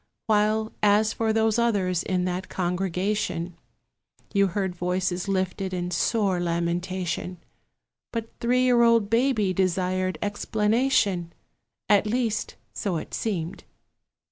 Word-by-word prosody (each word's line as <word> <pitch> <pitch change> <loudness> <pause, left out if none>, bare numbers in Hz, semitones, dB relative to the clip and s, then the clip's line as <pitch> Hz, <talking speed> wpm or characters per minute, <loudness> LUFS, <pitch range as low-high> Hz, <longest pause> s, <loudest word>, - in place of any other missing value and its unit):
While, 215 0 +1
as 210 +1 +4
for 225 -1 0
those 220 0 +2
others 195 -7 +1
in 180 -1 -1
that 185 +1 -3
congregation, 180 -1 -1 0.8
You 200 -1 +4
heard 190 0 -2
voices 180 +1 -1
lifted 190 0 -1
in 175 0 -3
sore 195 +1 +1
lamentation; 175 +1 -2 0.7
But 225 -1 -4
three 250 +2 +2
year 245 -2 +4
old 230 -3 +4
Baby 230 -5 +2
desired 185 -1 0
explanation: 210 -3 +1 0.5
At 210 0 +4
least, 225 -1 -1 0.2
so 190 -5 -2
it - - -7
seemed. 180 -6 -3
195 Hz, 115 wpm, -25 LUFS, 180-220 Hz, 0.8 s, as